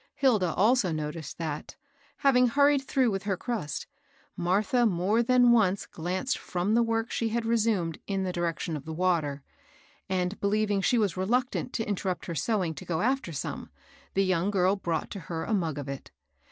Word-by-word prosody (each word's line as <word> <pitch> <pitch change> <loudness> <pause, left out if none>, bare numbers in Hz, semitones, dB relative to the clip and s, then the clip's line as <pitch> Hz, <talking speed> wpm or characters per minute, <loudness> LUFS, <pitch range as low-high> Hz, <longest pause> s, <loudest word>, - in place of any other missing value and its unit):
Hilda 215 -11 +3
also 215 -1 +3
noticed 155 -1 -4
that, 155 -3 -5 0.4
having 250 -3 +4
hurried 280 +3 +4
through 260 -3 +1
with 195 -1 -2
her* 195 -3 0
crust, 205 - -3 0.5
Martha 210 +7 +2
more 195 +4 +2
than 245 0 +5
once 200 -5 +3
glanced 180 +9 -2
from 180 +3 -1
the 235 - +4
work 230 0 0
she 230 - 0
had 230 +1 -1
re 230 +1 +2
sumed 205 -8 0
in 195 -1 -1
the 185 -1 -2
direction 170 -1 -2
of 150 - -7
the 160 0 -5
water; 160 -6 0 0.7
and, 185 +1 -1
beheving 205 -1 +1
she 245 - +3
was 205 -5 +1
reluctant 245 +6 0
to 225 - -2
interrupt 190 -2 -2
her 170 - -4
sewing 180 - 0
to 150 - -9
go 160 -2 -2
after 255 -5 0
some, 145 - -5 0.5
the 195 0 +3
young 185 0 +1
girl 190 -1 +2
brought 170 -5 -3
to 200 - -5
her 165 -2 -2
a 225 - -2
mug 165 -7 0
of 145 -1 -5
it. 140 -1 -6
195 Hz, 185 wpm, -28 LUFS, 170-230 Hz, 0.7 s, than